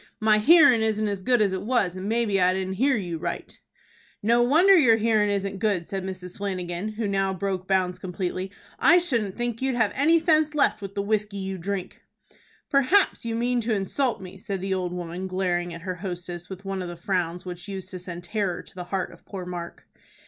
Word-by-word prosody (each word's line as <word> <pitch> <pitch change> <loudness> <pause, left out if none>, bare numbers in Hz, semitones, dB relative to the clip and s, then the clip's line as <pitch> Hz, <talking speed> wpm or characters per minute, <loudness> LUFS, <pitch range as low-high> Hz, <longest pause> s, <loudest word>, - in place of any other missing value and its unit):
"My 215 -1 +4
hearin' 285 -2 +7
isn't 215 -1 +1
as 200 -2 -3
good 245 +1 +3
as 195 -2 0
it 190 - -2
was, 205 -5 0
and 190 +2 -4
maybe 220 -4 +1
I 180 +1 +4
didn't 190 0 -2
hear 270 -2 +4
you 175 -5 -4
right." - - -5 0.7
"No 235 +3 +4
wonder 325 +11 +6
your 245 -10 +6
hearin' 215 -2 +2
isn't 200 -1 -2
good," 195 -6 0
said 195 -1 -4
Mrs. 185 -1 -7
Flanagan, 185 -1 -3
who 215 0 -2
now 195 -1 0
broke 185 0 -3
bounds 185 -2 +1
completely. 185 0 -3 0.3
"I 330 +7 +6
shouldn't 235 - 0
think 240 -1 -2
you'd 265 -1 0
have 225 -4 +2
any 315 +5 +4
sense 315 -2 +2
left 275 -7 +2
with 195 0 -7
the 200 - -1
whiskey 210 -1 -1
you 190 -1 -4
drink." 190 +1 -4 0.7
"Perhaps 280 +4 +3
you 230 -1 -2
mean 240 +1 +1
to 225 -1 0
insult 230 +6 -1
me," 190 0 -10
said 195 -1 -4
the 190 +1 -2
old 180 -2 -2
woman, 180 +1 -5
glaring 180 -2 -1
at 165 0 -8
her 185 0 -3
hostess 175 -1 -6
with 190 +1 -9
one 195 -1 -3
of 180 - -4
the 175 - -7
frowns 175 -1 -2
which 180 +1 -7
used 190 -2 -6
to 185 - -7
send 175 -1 -7
terror 195 -1 -2
to - - -17
the 180 -1 -7
heart 190 +1 -2
of - - -18
poor 190 -3 -7
Mark. 175 -1 -7
195 Hz, 215 wpm, -25 LUFS, 185-225 Hz, 0.7 s, hearin